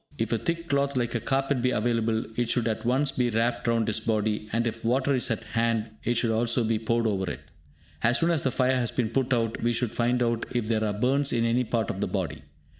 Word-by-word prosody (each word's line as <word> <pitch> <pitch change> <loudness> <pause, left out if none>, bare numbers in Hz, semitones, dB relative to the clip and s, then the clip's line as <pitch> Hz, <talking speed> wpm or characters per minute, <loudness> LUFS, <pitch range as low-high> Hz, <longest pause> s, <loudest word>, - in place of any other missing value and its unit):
If 115 -1 -2
a 115 - +1
thick 170 0 -3
cloth 140 -2 +1
like 120 -1 0
a 115 - 0
carpet 135 +1 0
be 125 - +2
available, 115 -1 0
it 120 0 0
should 120 -2 +1
at 110 0 -2
once 135 +3 +2
be 125 -1 0
wrapped 115 +2 0
round 115 -1 +2
his 105 - 0
body; 105 -1 -1
and 115 +2 +1
if 115 -1 -3
water 130 +4 +2
is 130 - 0
at - - -2
hand, 115 -1 -1
it 120 - 0
should 115 -1 +1
also 115 +2 +1
be 110 -1 0
poured 115 +1 0
over 95 -4 0
it. - - -6 0.6
As 120 +1 +3
soon 170 +1 +2
as 160 -4 +2
the 135 - +1
fire 130 0 +1
has 120 -2 0
been 115 -1 -1
put 130 +1 0
out, 115 -2 0
we 120 +1 +1
should 120 -2 0
find 120 +1 +1
out 115 -1 -1
if 120 -3 0
there 110 -1 +1
are 105 - 0
burns 135 +4 +2
in 115 -1 +1
any 120 +2 +2
part 115 -2 -1
of - - -6
the - - 0
body. - - -3
120 Hz, 255 wpm, -27 LUFS, 115-125 Hz, 0.6 s, As